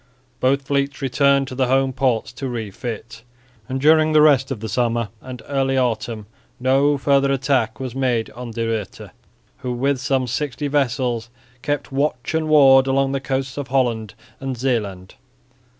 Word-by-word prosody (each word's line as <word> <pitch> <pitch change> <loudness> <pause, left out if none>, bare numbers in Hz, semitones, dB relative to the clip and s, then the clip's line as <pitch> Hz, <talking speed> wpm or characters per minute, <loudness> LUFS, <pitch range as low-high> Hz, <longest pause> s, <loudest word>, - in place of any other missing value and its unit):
Both 135 +2 +2
fleets 140 0 -1
returned 140 +1 +2
to - - -7
the 130 0 0
home 135 +1 +2
ports 125 -3 0
to 135 +2 -5
refit; 115 0 -6 0.5
and 130 +1 -2
during 155 +2 +4
the 155 - +6
rest 135 -3 +4
of 135 -5 -4
the 110 - -5
summer 115 -1 0
and 125 -2 -9
early 135 -1 0
autumn 115 -3 -1 0.3
no 135 +3 +3
further 140 0 +2
attack 130 -4 0
was 130 -3 -5
made 125 -4 -1
on 120 +2 -8
De 115 0 -3
Ruyter, 110 -3 -4 0.5
who 130 -3 -4
with 135 +2 0
some 135 -1 0
sixty 145 +3 -3
vessels 125 -4 0 0.3
kept 145 +1 -2
watch 135 -2 -1
and 160 -1 0
ward 135 -3 +6
along 135 0 +1
the 135 - -1
coasts 135 0 -3
of 140 - -4
Holland 115 -6 0 0.2
and 135 -2 -4
Zeeland. 105 -7 -2
130 Hz, 165 wpm, -21 LUFS, 120-140 Hz, 0.5 s, the